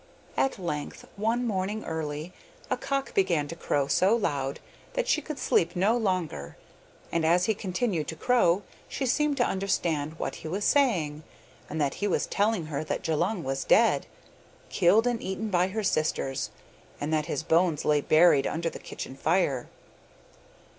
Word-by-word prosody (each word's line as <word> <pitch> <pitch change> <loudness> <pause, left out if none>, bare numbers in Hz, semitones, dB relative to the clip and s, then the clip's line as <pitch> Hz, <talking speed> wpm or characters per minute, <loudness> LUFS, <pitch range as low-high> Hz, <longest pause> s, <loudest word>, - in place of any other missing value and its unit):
At 270 - +1
length, 170 -6 -5
one 225 +4 0
morning 210 0 -2
early, 160 +1 -4 0.4
a - - +3
cock 275 -1 -3
began 170 -6 +2
to 165 - -5
crow 145 -4 0
so 190 +9 +3
loud 140 - -1 0.3
that - - -1
she 315 - +2
could 305 -1 -6
sleep 170 +1 +1
no 200 +6 +3
longer 180 - -2 0.5
and 165 - 0
as 175 +3 +4
he 220 - +2
continued 190 -4 -2
to 160 - -4
crow 205 -4 +3 0.3
she 270 - -2
seemed 295 +3 +1
to 245 - +3
understand 165 -6 -1
what - - -4
he - - -6
was 195 +6 -2
saying, 175 - +2 0.5
and 155 - -4
that 140 -2 +1
he 205 - +2
was 195 - +1
telling 205 -4 0
her 155 -1 -3
that 155 - -3
Djulung 175 +4 0
was 135 0 -2
dead, - - +4 0.6
killed 205 +7 +4
and 240 -2 0
eaten 200 +3 -3
by 180 0 +3
her 215 +3 -3
sisters, 155 -6 0 0.5
and 150 +2 -2
that 155 0 +1
his 165 - -2
bones 165 -1 +2
lay 150 -1 +3
buried 155 -2 +5
under 165 +1 -2
the - - -8
kitchen 130 - -7
fire. 145 -4 +1
175 Hz, 165 wpm, -27 LUFS, 155-215 Hz, 0.6 s, buried